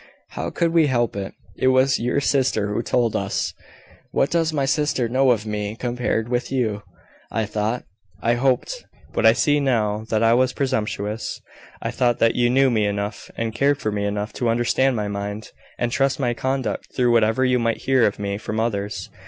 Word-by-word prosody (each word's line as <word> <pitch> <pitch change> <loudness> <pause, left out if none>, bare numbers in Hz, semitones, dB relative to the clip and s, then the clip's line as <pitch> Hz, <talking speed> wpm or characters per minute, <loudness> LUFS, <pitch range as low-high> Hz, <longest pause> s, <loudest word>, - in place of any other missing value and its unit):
"How - - -4
could 170 -1 0
we 165 -3 +5
help 120 -5 0
it? 100 -1 -5 0.2
It - - 0
was 130 +1 +4
your 125 +4 0
sister 130 -7 +1
who 110 - 0
told 115 -1 0
us." 100 0 -1 0.6
"What 135 - +1
does 165 -1 +1
my 145 -3 0
sister 140 -3 +1
know 130 +3 +2
of 110 -3 +2
me 105 0 -3
compared 120 -2 -1
with 120 +1 -2
you? 110 -6 0 0.5
I 110 0 -1
thought 105 +3 -2 0.4
I 115 +3 +2
hoped 130 - 0 0.3
but - - +3
I - - +7
see 145 -1 +2
now 110 -6 0
that 110 0 +1
I 115 0 +5
was 130 +1 +2
presumptuous 110 -5 -2 0.4
I - - -2
thought 120 -2 +1
that 115 - +3
you 120 -1 +2
knew 135 +1 +4
me 110 -3 +2
enough, 100 +1 -4
and 115 -1 -2
cared 140 +5 +2
for 110 -6 -2
me 100 0 -2
enough, 105 +1 -3
to 120 - +2
understand 120 +3 +2
my 105 -2 -2
mind, 100 +1 -5 0.3
and 120 -1 -1
trust 135 +3 +1
my 120 -3 +1
conduct 130 +1 -2
through 125 -2 +3
whatever 115 +2 +3
you 125 -1 +2
might 115 -1 0
hear 130 -3 +4
of 100 - -3
me 100 0 -3
from 110 0 -3
others. 105 -3 -2
120 Hz, 195 wpm, -22 LUFS, 105-130 Hz, 0.6 s, I